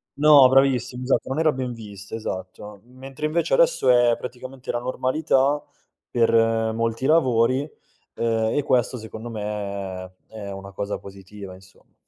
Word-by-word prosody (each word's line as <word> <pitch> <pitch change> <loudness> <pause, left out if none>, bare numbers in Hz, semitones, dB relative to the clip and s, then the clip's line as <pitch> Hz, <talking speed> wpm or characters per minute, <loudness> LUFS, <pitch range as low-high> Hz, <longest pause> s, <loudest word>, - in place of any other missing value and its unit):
no, 145 -3 +7
bravissimo, 130 -2 +2
esatto, 130 - 0
non 135 +4 -2
era 160 -1 +3
ben 130 -2 -4
vista, 100 -3 -11
esatto. 100 0 -7
Mentre 135 +4 -8
invece 170 - +1
adesso - - +3
è 120 -1 +5
praticamente 125 +2 -7
la 120 - -2
normalità 130 +2 +1 0.5
per 115 -1 +2 0.4
molti 115 +2 -2
lavori, 130 -5 +3 0.6
uhm, 115 -1 0
e 145 - +2
questo, 125 -2 +1
secondo 110 +1 -8
me, 100 -3 -5
è 105 -2 -8
una 95 0 -9
cosa 100 +1 -4
positiva 100 0 -11
insomma. 95 0 -21
120 Hz, 140 wpm, -23 LUFS, 105-130 Hz, 0.6 s, no